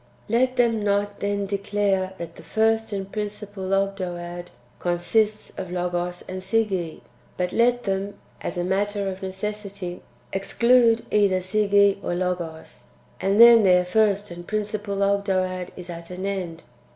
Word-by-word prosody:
6. -, -, -9 dB
Let 255 Hz, +1 st, +2 dB
them 230 Hz, -3 st, +2 dB
not 205 Hz, 0 st, 0 dB
then 200 Hz, 0 st, -1 dB
declare 195 Hz, -1 st, 0 dB
that 170 Hz, -2 st, -7 dB
the -, -, -11 dB
first 220 Hz, +5 st, +1 dB
and 195 Hz, -1 st, -4 dB
principal 210 Hz, -2 st, -5 dB
Ogdoad 175 Hz, -3 st, -2 dB, 0.3 s
consists 210 Hz, +5 st, 0 dB
of 185 Hz, -2 st, -5 dB
Logos 175 Hz, 0 st, -2 dB
and 185 Hz, 0 st, -5 dB
Sige, 190 Hz, -5 st, -1 dB, 0.4 s
but 180 Hz, 0 st, -1 dB
let 245 Hz, +1 st, +3 dB
them 195 Hz, +1 st, -2 dB, 0.3 s
[as -, -, -4 dB
a 175 Hz, -, 0 dB
matter 200 Hz, +2 st, 0 dB
of 190 Hz, 0 st, -5 dB
necessity] 195 Hz, -1 st, -5 dB, 0.3 s
exclude 235 Hz, +3 st, +3 dB
either 200 Hz, -3 st, +3 dB
Sige 200 Hz, +1 st, +3 dB
or 175 Hz, -, -1 dB
Logos; 175 Hz, -3 st, -4 dB, 0.3 s
and 195 Hz, +2 st, +1 dB
then 235 Hz, -1 st, +10 dB
their 180 Hz, -2 st, +4 dB
first 205 Hz, +1 st, +2 dB
and 175 Hz, 0 st, -9 dB
principal 210 Hz, -1 st, -2 dB
Ogdoad 185 Hz, -2 st, 0 dB
is 180 Hz, -1 st, -7 dB
at 170 Hz, -1 st, -8 dB
an 180 Hz, +1 st, -5 dB
end. 180 Hz, -4 st, -4 dB
195 Hz, 145 wpm, -24 LUFS, 180-210 Hz, 0.4 s, then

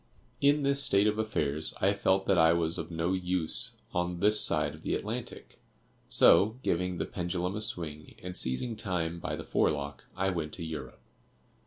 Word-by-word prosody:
"In 145 Hz, +1 st, +4 dB
this 140 Hz, 0 st, +2 dB
state 100 Hz, -5 st, +4 dB
of 105 Hz, 0 st, +1 dB
affairs 80 Hz, -8 st, -1 dB
I 100 Hz, +2 st, +3 dB
felt 95 Hz, -1 st, +1 dB
that 95 Hz, -2 st, +3 dB
I 80 Hz, 0 st, +6 dB
was 85 Hz, -1 st, +1 dB
of -, -, -5 dB
no 85 Hz, +2 st, -1 dB
use 90 Hz, -3 st, 0 dB, 0.2 s
on 90 Hz, 0 st, -1 dB
this 105 Hz, +3 st, +4 dB
side -, -, +1 dB
of -, -, -13 dB
the -, -, -1 dB
Atlantic; -, -, -6 dB, 0.5 s
so, 110 Hz, +5 st, +5 dB
giving 90 Hz, +1 st, -1 dB
the -, -, -2 dB
pendulum 90 Hz, +1 st, -3 dB
a 105 Hz, -, -3 dB
swing, 80 Hz, -7 st, -2 dB
and 90 Hz, 0 st, -6 dB
seizing 110 Hz, -, -1 dB
time 85 Hz, -5 st, -3 dB
by -, -, -3 dB
the -, -, -7 dB
forelock, 70 Hz, -2 st, -1 dB
I 95 Hz, +1 st, +1 dB
went 80 Hz, -4 st, -4 dB
to 85 Hz, -, -5 dB
Europe. 80 Hz, -3 st, -7 dB
90 Hz, 180 wpm, -30 LUFS, 80-100 Hz, 0.5 s, I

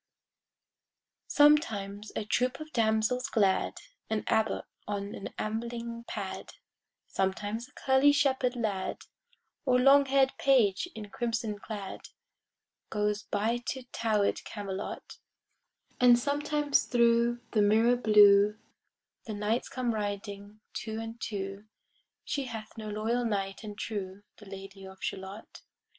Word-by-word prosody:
Sometimes 215 Hz, -9 st, +3 dB
a 210 Hz, -, -2 dB
troop 250 Hz, +5 st, 0 dB
of 310 Hz, 0 st, -9 dB
damsels 220 Hz, +2 st, +1 dB
glad, 200 Hz, -4 st, +2 dB, 0.3 s
An 220 Hz, -1 st, -1 dB
abbot 220 Hz, 0 st, +1 dB, 0.2 s
on 200 Hz, -1 st, -3 dB
an -, -, -6 dB
ambling 235 Hz, +1 st, -4 dB
pad, 195 Hz, -3 st, -5 dB, 0.5 s
Sometimes 205 Hz, +5 st, -2 dB
a -, -, -24 dB
curly 265 Hz, +2 st, +4 dB
shepherd 265 Hz, -3 st, +2 dB
lad, 210 Hz, -5 st, -2 dB, 0.6 s
Or 255 Hz, -4 st, +3 dB
long 275 Hz, +2 st, +6 dB
hair'd 270 Hz, 0 st, +3 dB
page 245 Hz, -, +3 dB
in 210 Hz, -2 st, -8 dB
crimson 225 Hz, -3 st, -2 dB
clad, 205 Hz, -3 st, -7 dB, 0.8 s
Goes 210 Hz, 0 st, 0 dB
by 225 Hz, +4 st, 0 dB
to 260 Hz, -, -3 dB
tower'd 215 Hz, -3 st, +1 dB
Camelot; 200 Hz, -2 st, -6 dB, 0.8 s
And 245 Hz, -1 st, +7 dB
sometimes 290 Hz, +2 st, +1 dB
thro' 235 Hz, -1 st, +3 dB
the 215 Hz, -, +3 dB
mirror 220 Hz, +4 st, +4 dB
blue 210 Hz, -2 st, +6 dB, 0.7 s
The 215 Hz, -, -4 dB
knights 210 Hz, +4 st, -1 dB
come 250 Hz, -2 st, -1 dB
riding 205 Hz, 0 st, -5 dB
two 220 Hz, 0 st, -4 dB
and 225 Hz, +1 st, -7 dB
two: 195 Hz, -1 st, -4 dB, 0.6 s
She 280 Hz, -2 st, -2 dB
hath 220 Hz, -3 st, -7 dB
no 215 Hz, -2 st, -6 dB
loyal 220 Hz, +4 st, -1 dB
knight 200 Hz, -3 st, -2 dB
and 210 Hz, -1 st, -7 dB
true, 200 Hz, -2 st, -5 dB
The 205 Hz, -2 st, -13 dB
Lady 195 Hz, 0 st, -9 dB
of 190 Hz, 0 st, -10 dB
Shalott. 195 Hz, +3 st, -6 dB
220 Hz, 120 wpm, -30 LUFS, 205-245 Hz, 0.8 s, And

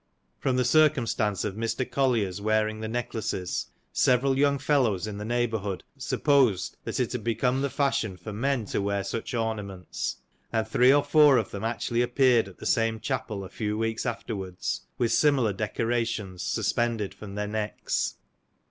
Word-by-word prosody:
From 130 Hz, -2 st, 0 dB
the 125 Hz, -1 st, +2 dB
circumstance 120 Hz, -8 st, +2 dB
of 105 Hz, -, -2 dB
Mr. 115 Hz, +4 st, -2 dB
Collier's 115 Hz, -8 st, 0 dB
wear 110 Hz, +1 st, +2 dB
ing 110 Hz, 0 st, -5 dB
the 110 Hz, -, -4 dB
necklaces, 110 Hz, -5 st, -3 dB, 0.3 s
several 130 Hz, +2 st, +3 dB
young 140 Hz, +1 st, +3 dB
fellows 130 Hz, -8 st, +1 dB
in 105 Hz, -1 st, -5 dB
the 105 Hz, -, -5 dB
neighbourhood 110 Hz, -5 st, -1 dB
supposed 130 Hz, -10 st, +2 dB
that -, -, -3 dB
it -, -, 0 dB
had -, -, -3 dB
become 125 Hz, +3 st, +1 dB
the 140 Hz, -, 0 dB
fashion 125 Hz, -9 st, 0 dB
for 95 Hz, +4 st, -7 dB
men 125 Hz, +1 st, 0 dB
to 100 Hz, -, -2 dB
wear 100 Hz, 0 st, -1 dB
such 115 Hz, +5 st, -4 dB
ornaments; 105 Hz, -5 st, -3 dB, 0.3 s
and 110 Hz, -1 st, 0 dB
three 125 Hz, +3 st, +5 dB
or 145 Hz, +1 st, +4 dB
four 150 Hz, -4 st, +6 dB
of 110 Hz, -, -1 dB
them 100 Hz, -, -5 dB
actually 115 Hz, +1 st, 0 dB
appeared 120 Hz, -3 st, +3 dB
at 95 Hz, -, -13 dB
the -, -, -10 dB
same 115 Hz, -1 st, +1 dB
chapel 110 Hz, -7 st, -3 dB
a 95 Hz, -, -8 dB
few 105 Hz, -1 st, -3 dB
weeks 115 Hz, 0 st, -1 dB
afterwards, 100 Hz, -6 st, -3 dB, 0.2 s
with 120 Hz, -2 st, +1 dB
similar 135 Hz, -8 st, +3 dB
decorations 110 Hz, -2 st, -2 dB
suspended 115 Hz, -4 st, 0 dB
from 100 Hz, -2 st, -9 dB
their 105 Hz, 0 st, -2 dB
necks. 105 Hz, 0 st, -2 dB
115 Hz, 165 wpm, -27 LUFS, 105-125 Hz, 0.3 s, four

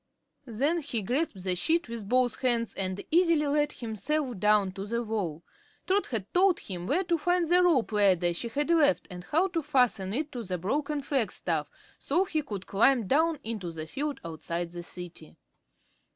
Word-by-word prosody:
Then 280 Hz, +9 st, 0 dB
he 245 Hz, -7 st, -3 dB
grasped 245 Hz, -, -1 dB
the 185 Hz, -1 st, 0 dB
sheet 325 Hz, -, +1 dB
with 230 Hz, -4 st, -6 dB
both 250 Hz, -1 st, +2 dB
hands 235 Hz, -3 st, +1 dB
and 190 Hz, 0 st, -3 dB
easily 335 Hz, -2 st, +4 dB
let 295 Hz, +1 st, +1 dB
himself 245 Hz, +2 st, -3 dB
down 210 Hz, -1 st, +3 dB
to 195 Hz, +1 st, -7 dB
the 235 Hz, +2 st, -1 dB
wall. 190 Hz, -8 st, -3 dB, 0.4 s
Trot 395 Hz, +2 st, +1 dB
had 215 Hz, -6 st, -4 dB
told 370 Hz, 0 st, +4 dB
him 180 Hz, -2 st, -6 dB
where 345 Hz, -, +1 dB
to 340 Hz, -2 st, 0 dB
find 355 Hz, +1 st, +1 dB
the 355 Hz, +2 st, +5 dB
rope 320 Hz, -11 st, +3 dB
ladder 185 Hz, -5 st, +3 dB
she 175 Hz, -, -3 dB
had 290 Hz, +7 st, -1 dB
left 295 Hz, -4 st, +3 dB
and 180 Hz, 0 st, -8 dB
how 335 Hz, +5 st, +2 dB
to 335 Hz, -2 st, -1 dB
fasten 250 Hz, -10 st, +1 dB
it 290 Hz, +7 st, -2 dB
to 245 Hz, -, -5 dB
the 185 Hz, -4 st, -3 dB
broken 285 Hz, -, -2 dB
flagstaff 180 Hz, -, -1 dB, 0.3 s
so 345 Hz, +7 st, +1 dB
he 320 Hz, -5 st, -1 dB
could 205 Hz, -10 st, -6 dB
climb 230 Hz, +3 st, +3 dB
down 315 Hz, -, +2 dB
into 210 Hz, -6 st, -4 dB
the 160 Hz, -1 st, -6 dB
field 280 Hz, -, -4 dB
outside 170 Hz, +1 st, -4 dB
the 175 Hz, 0 st, -6 dB
City. 175 Hz, -2 st, -9 dB
240 Hz, 180 wpm, -28 LUFS, 190-300 Hz, 0.4 s, the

